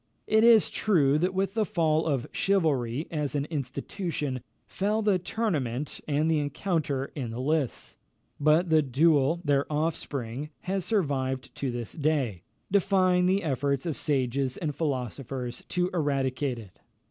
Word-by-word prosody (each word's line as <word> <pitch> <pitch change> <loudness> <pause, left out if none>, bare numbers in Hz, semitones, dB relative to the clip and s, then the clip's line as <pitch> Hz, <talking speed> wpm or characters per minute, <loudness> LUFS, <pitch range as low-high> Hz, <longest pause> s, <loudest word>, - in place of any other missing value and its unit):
It 220 +1 +3
is 230 -3 +6
true 150 -8 +3
that 180 +3 0
with 195 0 0
the 220 -1 +2
fall 160 -4 +1
of 135 -6 0
chivalry, 150 -8 +1
as 150 -3 -2
an 140 -1 0
institution, 145 0 -3 0.2
fell 210 +3 -1
the 200 -3 +3
tournament 150 - -2
and 150 +1 +1
the 160 -2 +2
encounter 145 -2 -1
in 130 -6 -4
the 115 +2 -5
lists; 145 0 -1 0.4
but 155 +4 +3
the 155 -1 +6
duel, 150 +3 +3
their 145 0 +1
offspring, 150 -4 -2
has 190 -1 -2
survived 135 - -1
to 135 - -3
this 120 -2 -5
day, 145 - 0 0.3
defying 185 -2 +3
the 190 +1 +2
efforts 140 -1 0
of 165 -4 -1
sages 135 -2 0
and 155 -3 -2
philosophers 130 -3 -3
to 180 0 0
eradicate 140 -4 0
it. 105 -5 -12
150 Hz, 145 wpm, -28 LUFS, 135-175 Hz, 0.4 s, is